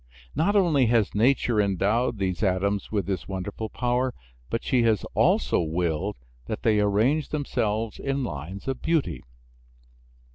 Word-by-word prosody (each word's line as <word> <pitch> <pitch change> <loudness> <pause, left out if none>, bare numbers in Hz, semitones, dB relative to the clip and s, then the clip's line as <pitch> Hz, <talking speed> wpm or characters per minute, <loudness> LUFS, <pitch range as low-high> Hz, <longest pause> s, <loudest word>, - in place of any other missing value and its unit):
Not 200 +6 +1
only 160 - +4
has 115 -3 +2
nature 115 0 +3
endowed 105 +5 +1
these 95 -1 -2
atoms 100 0 0
with 105 -2 0
this 95 -3 -3
wonderful 100 +3 -4
power, 125 +2 0 0.3
but 115 - -2
she 130 -2 +2
has 110 -3 +2
also - - +3
willed 80 -1 -1 0.3
that 110 - -4
they 110 -3 +3
arrange 110 +9 +2
themselves 115 -7 -2
in 135 0 -1
lines 90 - -6
of 135 -1 -2
beauty. 160 -4 0
110 Hz, 140 wpm, -26 LUFS, 100-130 Hz, 0.3 s, only